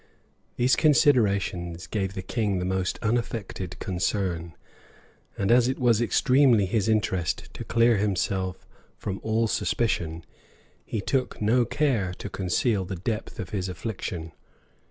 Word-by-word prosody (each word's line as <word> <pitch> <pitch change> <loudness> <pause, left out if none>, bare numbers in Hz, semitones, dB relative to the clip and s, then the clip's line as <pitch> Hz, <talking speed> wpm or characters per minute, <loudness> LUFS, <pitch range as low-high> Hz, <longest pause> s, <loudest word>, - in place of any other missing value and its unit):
These 125 +2 +3
considerations 100 - +2
gave 95 0 -3
the 95 - -4
king 105 -2 -1
the 90 - -2
most 95 0 -1
unaffected 105 -5 -2
concern; 90 -3 -2 0.8
and 100 +2 +1
as 120 0 +5
it 130 - -1
was 120 -3 +3
extremely 125 -2 +4
his 105 +2 0
interest 95 -6 0
to - - -6
clear 115 -1 +3
himself 95 -2 -1 0.3
from 100 -1 -4
all 110 +1 +1
suspicion, 85 -8 -1 0.6
he 110 - -3
took 130 +5 -1
no 120 +4 +3
care 115 -9 0
to - - -7
conceal 95 +3 0
the 95 +1 -5
depth 105 +6 -4
of 95 -6 -5
his 95 -2 -2
affliction. 90 -5 -5
100 Hz, 135 wpm, -26 LUFS, 95-115 Hz, 0.8 s, as